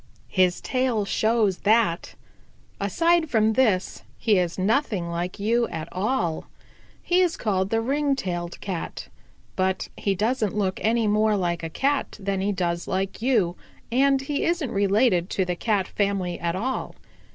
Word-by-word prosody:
"His 185 -2 +3
tail 255 -5 0
shows 215 -2 +1
that. 210 -5 +1 0.6
Aside 330 - +2
from 220 -2 +3
this, 215 -7 +1 0.2
he 210 -5 +3
is 175 -2 -1
nothing 200 -3 0
like 175 +3 -4
you 230 +3 +1
at 160 -1 -5
all. 185 -4 -1 0.6
He 360 +1 +3
is 355 -3 +1
called 190 -3 0
the 225 +1 +1
Ring 280 +3 +1
tailed 175 -6 -4
Cat. 185 -4 -5 0.5
But 190 0 -1
he 200 -1 -1
doesn't 215 0 0
look 190 -2 0
any 230 +1 +2
more 215 0 +2
like 170 -2 -1
a 165 - -4
Cat 275 - -1
than 195 -1 -2
he 200 +2 0
does 175 -3 -2
like 195 +2 -2
you, 220 -9 +2 0.4
and 270 +2 +3
he 285 +1 -2
isn't 335 -7 0
related 200 -2 +2
to 190 - 0
the 180 0 -2
Cat 200 0 0
family 195 -3 -1
at 170 0 -1
all. 255 +7 -3
205 Hz, 155 wpm, -24 LUFS, 185-240 Hz, 0.6 s, His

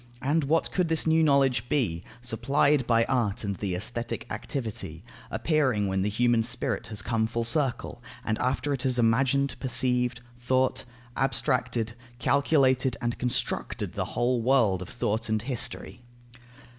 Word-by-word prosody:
And 145 +3 +1
what 160 +4 +1
could 180 -2 +1
this 160 -1 +1
new 160 0 +4
knowledge 135 -5 +3
be, 90 - 0 0.2
supplied 135 +3 +2
by 115 -1 +4
art 120 -5 0
and 100 -1 -2
by - - -17
the 95 -3 -1
aesthetic 115 +5 -3
activity, 115 -7 -4 0.3
appearing 130 -10 +1
when 95 0 0
the 100 - 0
human 120 +2 +2
spirit 115 -1 -2
has 105 -2 -5
come 110 0 0
full 115 +1 -2
circle, 120 -1 -1 0.2
after 130 +6 0
it 135 - -3
has 130 -2 +1
imagined, 130 +4 +2
perceived, 125 -1 +1 0.2
thought, 130 +1 +1 0.3
abstracted, 125 -3 0 0.2
calculated, 130 -2 +2
and 120 0 -2
constructed 125 -1 -2
the - - -2
whole 120 0 +2
world 115 -7 +3
of 90 - -7
thought 110 +2 -2
and 110 0 0
history? 125 -1 -3
125 Hz, 145 wpm, -27 LUFS, 115-135 Hz, 0.3 s, new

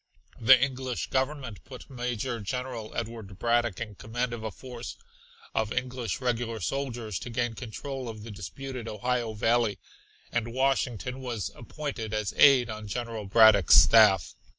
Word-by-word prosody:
The 125 +2 +7
English 130 -1 -2
Government 130 -5 -2
put 130 -2 -11
Major 125 -2 -3
General 120 +1 -4
Edward 110 -4 -5
Braddock 120 -2 +1
in 115 -3 -5
command 120 +4 -3
of 115 -2 -6
a 110 - -2
force 120 +3 -8 0.6
of 110 -1 0
English 125 -4 -2
regular 120 -3 -1
soldiers 115 - -3
to 120 - -7
gain 120 0 -1
control 130 +2 -6
of 110 -2 -8
the 115 - -8
disputed 120 +5 -7
Ohio 115 +1 -1
Valley, 115 -1 +1 0.5
and 120 -1 -2
Washington 130 -2 0
was 120 -6 -4
appointed 120 -4 -5
as 105 -2 -2
aide 135 -4 +7
on 110 -1 -6
General 115 -1 -4
Braddock's 105 -4 +7
staff. 105 -6 +6
120 Hz, 145 wpm, -28 LUFS, 110-125 Hz, 0.6 s, The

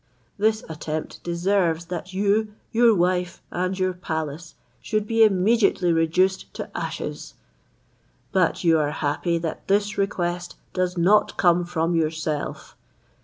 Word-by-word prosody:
This 215 +1 +2
attempt 155 0 -5
deserves 170 -1 +1
that 180 +1 -6
you, 205 +2 +1 0.2
your 230 -1 +5
wife, 180 0 0
and 185 +1 -1
your 185 -1 0
palace, 160 -2 -5 0.3
should 215 -1 -1
be 225 +1 +4
immediately 200 -3 +3
reduced 180 +4 +1
to - - -7
ashes: - - -5 1.0
but 185 -3 +1
you 165 -2 +4
are 145 -1 +1
happy 155 +3 -1
that 165 -1 -5
this 205 +1 +1
request 175 -3 -2 0.2
does 185 -1 -1
not 195 +5 +3
come 175 -1 +3
from 170 0 -1
yourself. 155 -2 -2
180 Hz, 125 wpm, -24 LUFS, 165-200 Hz, 1.0 s, your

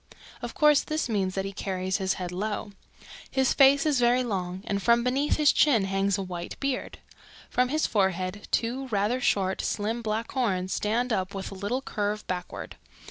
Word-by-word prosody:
Of 240 -1 -6
course 300 -2 +5
this 310 -2 -2
means 195 -5 -1
that 195 0 -1
he 195 - -5
carries 190 -1 -2
his 190 -2 0
head 180 -1 -5
low. 205 +3 -3 0.6
His 265 -1 +2
face 275 +1 +5
is 295 -4 +2
very 245 +1 +3
long 190 -4 -3
and 200 -1 -1
from 235 +3 +4
beneath 270 +4 +1
his 300 -2 +5
chin 250 -9 +4
hangs 195 0 +1
a 195 - -2
white 175 -2 -6
beard. 275 -2 -2 0.5
From 250 0 +2
his 310 +3 +1
forehead 190 -1 -1
two 250 +4 -1
rather 220 +3 0
short, 190 -5 +1
slim, 220 +3 -2
black 220 0 -2
horns 190 -8 0
stand 235 +3 0
up 190 -1 -2
with 195 - -5
a - - -6
little 205 +7 -3
curve 210 -3 -2
backward. 180 -1 -5
210 Hz, 185 wpm, -27 LUFS, 190-250 Hz, 0.6 s, course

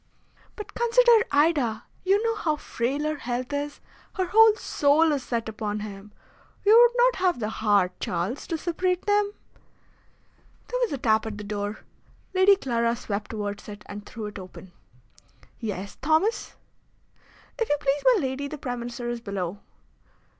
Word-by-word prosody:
"But 420 - -8
consider 475 -1 +4
Ida! 285 -7 +2 0.2
You 395 +3 +3
know 455 -1 +1
how 330 -8 0
frail 275 0 -2
her 305 0 -1
health 250 +2 -4
is. 290 0 -3 0.4
Her 375 -3 0
whole 440 +3 +6
soul 305 -4 +2
is 285 -2 0
set 235 -3 -3
upon 210 -1 -3
him. 205 0 -8 0.5
You 425 +2 +7
would 480 +1 +6
not - - +4
have 365 -7 +1
the 215 -2 -2
heart, 205 -4 +2
Charles, 180 +10 -3
to 330 - -2
separate 360 +2 -1
them?" 410 0 +2 1.4
There - - -1
was 485 - +1
a 280 - -2
tap 220 -2 +2
at 210 -2 -5
the 210 - -7
door. 205 +1 -4 0.5
Lady 380 +1 +6
Clara 235 -8 0
swept 210 -3 -4
towards 205 -1 -5
it 205 0 -9
and 205 0 -8
threw 220 +1 -7
it 210 -1 -7
open. 185 0 -11 0.9
"Yes, 200 -3 -5
Thomas?" 320 - +1 1.0
"If 455 - 0
you 295 - +2
please, 280 0 0
my 405 - +1
lady, 270 +1 -2
the 305 - -7
Prime 245 -3 -4
Minister 240 0 -5
is 240 -1 -3
below." 200 -3 -4
265 Hz, 160 wpm, -26 LUFS, -, 1.4 s, You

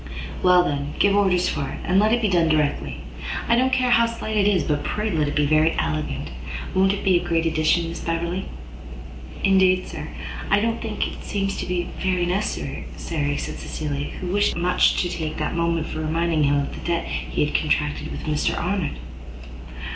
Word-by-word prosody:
"Well, 180 -1 +6
then, 145 -2 -2
give 200 0 +4
orders 190 -3 +3
for 140 - -2
it, - - -6
and 185 +2 +3
let 215 +1 +4
it 235 0 +2
be - - +4
done 175 -4 +3
directly. 70 - 0 0.5
I 235 - +4
don't 260 +2 +2
care 255 -1 +2
how 235 -1 +5
slight 230 -1 -4
it 205 -1 +3
is, 195 -4 +3
but 145 -1 -1
pray 215 0 -1
let 155 -4 +1
it 145 - -3
be 150 - +3
very 155 +2 +3
elegant. 75 -3 -2 0.4
Won't 190 +1 +4
it 200 - -3
be 185 -3 +4
a - - -7
great 165 -1 0
addition, 160 +1 +2
Miss 170 - -6
Beverley?" 170 +3 -2 1.0
"Indeed, 190 -1 +4
sir, - - -6 0.4
I 205 - +4
don't 230 +2 -1
think 220 -2 -2
it - - -9
seems 195 -1 -2
to - - -4
be 180 -1 -1
very 185 -2 +1
necessary," 190 +4 -2
said 145 -3 -2
Cecilia, 145 -2 -4
who 180 0 -3
wished 205 0 +2
much 180 +1 +3
to - - 0
take 160 -3 -4
that - - -2
moment 170 -1 0
for 155 - -5
reminding 160 0 +1
him 140 0 +3
of 140 0 -2
the - - -8
debt 170 -1 0
he - - -1
had 150 - -4
contracted 150 -1 0
with - - -6
Mr 150 -1 0
Arnott. 180 -2 -1
170 Hz, 200 wpm, -23 LUFS, 155-195 Hz, 1.0 s, Well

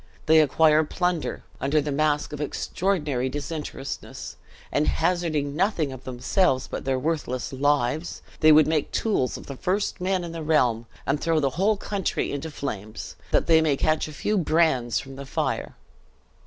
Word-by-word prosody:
They 160 0 +6
acquire 155 +1 +4
plunder, 180 +1 -2 0.2
under 140 +3 +2
the 150 0 -2
mask 150 +1 +1
of 150 - -5
extraordinary 150 -4 -1
disinterestedness; 145 0 -6 0.4
and 150 +1 +1
hazarding 160 -4 0
nothing 170 -5 +1
of 130 -1 -10
themselves 130 +3 +1
but - - -6
their 135 -1 +1
worthless 135 -4 -2
lives, 145 +3 0 0.2
they 155 -1 +7
would 155 0 +7
make 155 -2 0
tools 200 - 0
of - - -11
the 140 - -7
first 190 +3 -1
men 185 0 0
in 170 - -5
the 165 -1 -6
realm; 125 -7 +2 0.2
and 140 +2 0
throw 165 -1 +2
the 140 -3 +1
whole 200 +9 +2
country 200 -2 -2
into 145 +3 -4
flames, 110 -8 -6
that - - +2
they 160 -1 +5
may 150 -3 +2
catch 155 +2 +1
a - - -8
few 205 +7 0
brands 155 -8 +2
from 135 0 -9
the 140 - -7
fire!" - - -2
150 Hz, 170 wpm, -25 LUFS, 135-165 Hz, 0.4 s, they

